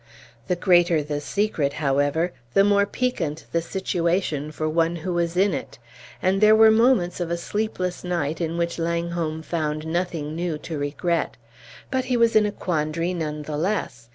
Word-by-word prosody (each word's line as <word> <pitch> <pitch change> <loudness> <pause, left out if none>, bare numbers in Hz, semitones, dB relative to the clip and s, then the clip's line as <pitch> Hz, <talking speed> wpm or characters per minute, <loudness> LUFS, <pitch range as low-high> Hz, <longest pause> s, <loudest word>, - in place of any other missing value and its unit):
The 180 - +1
greater 175 -3 +3
the 145 0 -3
secret, 160 -6 0
however, 145 +4 +1 0.2
the 195 - +6
more 200 0 +3
piquant 175 -11 -2
the 170 - +1
situation 170 -4 -1
for 155 0 -3
one 165 +2 +1
who 170 +2 -3
was 170 0 -1
in 195 0 +3
it; - - -5 0.5
and 190 +2 +2
there 215 0 +7
were 220 0 +7
moments 220 -6 +3
of 175 -2 -2
a 170 - -1
sleepless 185 -1 -3
night 170 -3 -2
in 165 0 -2
which 170 0 -1
Langholm 170 -1 -2
found 155 -1 -2
nothing 160 -2 -2
new 170 -2 -2
to 155 0 -6
regret. 155 +4 -1 0.5
But 260 -1 0
he 250 -1 +1
was 230 -1 +3
in 210 -1 +5
a - - -2
quandary 165 -1 -1
none 150 -3 -3
the 150 0 -4
less. 150 - -2
170 Hz, 175 wpm, -24 LUFS, 155-185 Hz, 0.5 s, there